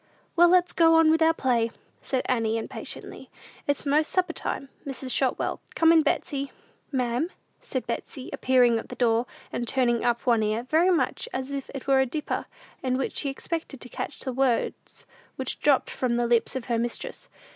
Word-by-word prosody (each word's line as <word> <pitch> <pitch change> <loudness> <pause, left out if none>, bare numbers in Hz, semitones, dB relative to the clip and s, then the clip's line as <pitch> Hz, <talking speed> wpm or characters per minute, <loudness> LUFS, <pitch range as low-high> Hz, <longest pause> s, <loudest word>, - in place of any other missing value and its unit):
"Well, 345 +1 +7
let's 360 0 +4
go 330 -1 +5
on 325 -1 +6
with 325 +1 +2
our 320 0 +6
play," 245 -7 +1 0.3
said 260 -2 -1
Annie, 225 -3 +1
impatiently. 225 - -7 0.4
"It's 285 0 0
most 300 +2 +3
supper 370 -1 +1
time, 275 - -4
Mrs. 265 -2 -5
Shotwell. 260 0 0
Come 330 0 +5
in, 330 -1 +6
Betsey." 280 -2 -1 0.4
"Ma'am?" 255 +4 0 0.3
said - - -4
Betsey, 265 -4 -5
appearing 245 -3 +4
at - - -10
the - - -7
door, 235 0 +2 0.3
and 240 - -2
turning 240 -2 +2
up 240 -1 0
one 235 -3 +4
ear, 215 +2 0
very 320 +8 +3
much 365 +6 0
as 260 +1 -3
if 275 -1 -4
it 270 - -6
were 270 -1 +4
a 265 - +3
dipper, 300 +4 -3 0.3
in 255 -1 0
which 270 - -2
she 280 - 0
expected 290 0 -4
to 250 - -10
catch - - -6
the 260 - -3
words 255 -2 -1 0.3
which 265 - -3
dropped 285 -3 +3
from 250 -2 0
the 240 0 +1
lips 235 +1 +2
of 260 -3 -3
her 235 -1 0
mistress. 235 0 -4
260 Hz, 190 wpm, -26 LUFS, 240-305 Hz, 0.4 s, Well